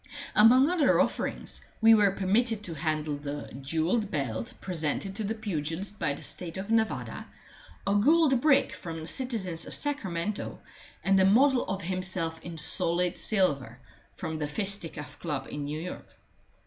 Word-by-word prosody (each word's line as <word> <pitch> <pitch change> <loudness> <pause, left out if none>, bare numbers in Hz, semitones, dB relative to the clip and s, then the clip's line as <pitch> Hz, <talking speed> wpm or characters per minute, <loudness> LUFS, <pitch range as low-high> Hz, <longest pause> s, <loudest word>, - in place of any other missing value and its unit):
Among 250 +6 +6
other 345 -3 +3
offerings, - - -2 0.2
we 225 0 +7
were 210 -2 +5
permitted 210 +4 +1
to 175 - -3
handle 155 -1 -2
the 145 0 -7
jewelled 165 - 0
belt 115 - -3
presented 180 +2 -3
to 220 - -2
the 215 +2 -2
pugilist 195 -1 -4
by 140 - 0
the - - -11
State 175 -1 -3
of 195 +3 -5
Nevada, 220 -1 -1 0.6
a 200 - +1
gold 270 +4 +4
brick 290 -2 +3
from 165 -1 -7
the - - -7
citizens 185 -3 -2
of - - -5
Sacramento, 210 - -3 0.5
and 195 0 +3
a - - +5
model 255 +6 +4
of 195 0 -3
himself 185 -2 -1
in 170 -1 -8
solid 170 +3 +5
silver 145 - 0 0.4
from 160 -1 -5
the 150 - -2
Fisticuff 165 -3 -4
Club 145 -5 -4
in 145 -1 -4
New 150 +2 -4
York. 180 +2 -7
185 Hz, 155 wpm, -28 LUFS, 155-215 Hz, 0.6 s, we